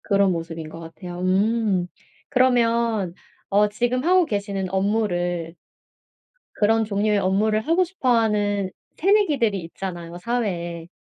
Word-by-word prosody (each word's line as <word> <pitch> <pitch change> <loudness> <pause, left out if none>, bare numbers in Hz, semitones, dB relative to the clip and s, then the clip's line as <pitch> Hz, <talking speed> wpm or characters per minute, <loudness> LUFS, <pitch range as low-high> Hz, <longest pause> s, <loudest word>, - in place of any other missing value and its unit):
그런 200 -2 +2
모습인 165 -2 -5
것 165 +1 -10
같아요. 175 +2 -9
음 195 0 +1 0.4
그러면 235 -6 +2 0.4
어 205 +1 +3
지금 245 +4 -1
하고 360 +2 +4
계시는 200 -5 -3
업무를 175 -4 -1 1.0
그런 225 +1 +2
종류의 210 0 +1
업무를 210 +3 +1
하고 335 +9 +2
싶어 355 -7 -3
하는 205 -3 +1 0.3
새내기들이 305 - +2
있잖아요, 170 0 -7
사회에. 175 -6 -3
205 Hz, 275 characters per minute, -23 LUFS, 180-230 Hz, 1.0 s, 하고